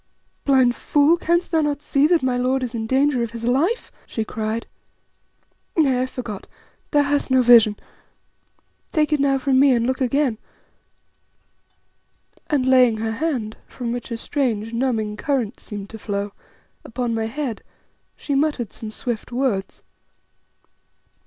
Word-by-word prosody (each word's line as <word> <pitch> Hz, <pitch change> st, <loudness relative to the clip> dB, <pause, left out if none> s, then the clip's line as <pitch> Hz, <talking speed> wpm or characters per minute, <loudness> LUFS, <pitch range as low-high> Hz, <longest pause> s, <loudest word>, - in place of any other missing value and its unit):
"Blind 260 Hz, -3 st, +4 dB
fool, 295 Hz, +3 st, +3 dB
canst 345 Hz, +1 st, 0 dB
thou 325 Hz, -2 st, +3 dB
not 295 Hz, -2 st, -1 dB
see 285 Hz, +1 st, +3 dB
that 335 Hz, -3 st, +2 dB
my 255 Hz, -1 st, +1 dB
lord 255 Hz, +1 st, 0 dB
is 245 Hz, -1 st, -4 dB
in 225 Hz, -1 st, -3 dB
danger 265 Hz, 0 st, +2 dB
of 235 Hz, -, -1 dB
his 230 Hz, +1 st, -8 dB
life?" 290 Hz, -, 0 dB, 0.2 s
she 225 Hz, -, -3 dB
cried. 220 Hz, +1 st, -3 dB, 1.1 s
"Nay, 270 Hz, -6 st, +3 dB
I -, -, +1 dB
forgot, 240 Hz, -6 st, -7 dB, 0.4 s
thou 290 Hz, -1 st, +3 dB
hast 285 Hz, 0 st, 0 dB
no 260 Hz, -1 st, +4 dB
vision. 230 Hz, -4 st, +6 dB, 1.1 s
Take 305 Hz, -2 st, +1 dB
it 300 Hz, -, +2 dB
now 275 Hz, -1 st, +3 dB
from 265 Hz, 0 st, +2 dB
me 275 Hz, -1 st, +6 dB
and 235 Hz, -1 st, +1 dB
look 260 Hz, +2 st, -1 dB
again;" 260 Hz, -2 st, +1 dB, 2.1 s
and 280 Hz, -4 st, +1 dB
laying 255 Hz, -3 st, +5 dB
her 220 Hz, 0 st, -2 dB
hand, 235 Hz, -5 st, -2 dB
from 240 Hz, -2 st, -5 dB
which 240 Hz, 0 st, -5 dB
a 230 Hz, -, -3 dB
strange, 230 Hz, -4 st, -2 dB
numbing 225 Hz, -4 st, -1 dB
current 255 Hz, -4 st, -1 dB
seemed 205 Hz, -2 st, -8 dB
to 220 Hz, -, -9 dB
flow, 205 Hz, -1 st, -3 dB, 0.5 s
upon 240 Hz, 0 st, -3 dB
my 225 Hz, 0 st, -1 dB
head, 250 Hz, -2 st, -4 dB, 0.5 s
she 285 Hz, -, -4 dB
muttered 275 Hz, -6 st, 0 dB
some 220 Hz, -, -7 dB
swift 230 Hz, +1 st, -5 dB
words. 240 Hz, -7 st, -2 dB
250 Hz, 150 wpm, -22 LUFS, 225-280 Hz, 2.1 s, vision